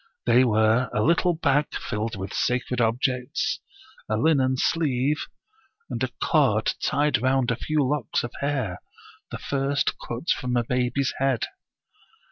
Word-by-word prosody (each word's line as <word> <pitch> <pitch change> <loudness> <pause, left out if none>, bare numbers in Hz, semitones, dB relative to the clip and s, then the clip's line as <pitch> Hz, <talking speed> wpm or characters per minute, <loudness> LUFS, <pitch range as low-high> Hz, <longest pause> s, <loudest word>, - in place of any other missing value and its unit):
They 120 +2 +5
were 110 +1 +3
a 105 - 0
little 170 +2 +3
bag 150 -2 +1
filled 110 +2 -3
with 95 0 -6
sacred 125 0 0
objects, 125 - 0 0.5
a 110 - +1
linen 130 -1 +2
sleeve, 145 -1 0 0.6
and - - -3
a - - 0
cord - - +2
tied 145 -5 +2
round 130 -1 +2
a - - +1
few 150 +2 0
locks 145 -4 -1
of 120 - -4
hair, 135 -11 -2 0.5
the - - -5
first 140 0 0
cut 120 +9 -6
from 125 -1 0
a 120 - +2
baby's 125 +2 0
head. 135 0 +1
130 Hz, 140 wpm, -25 LUFS, 120-145 Hz, 0.6 s, They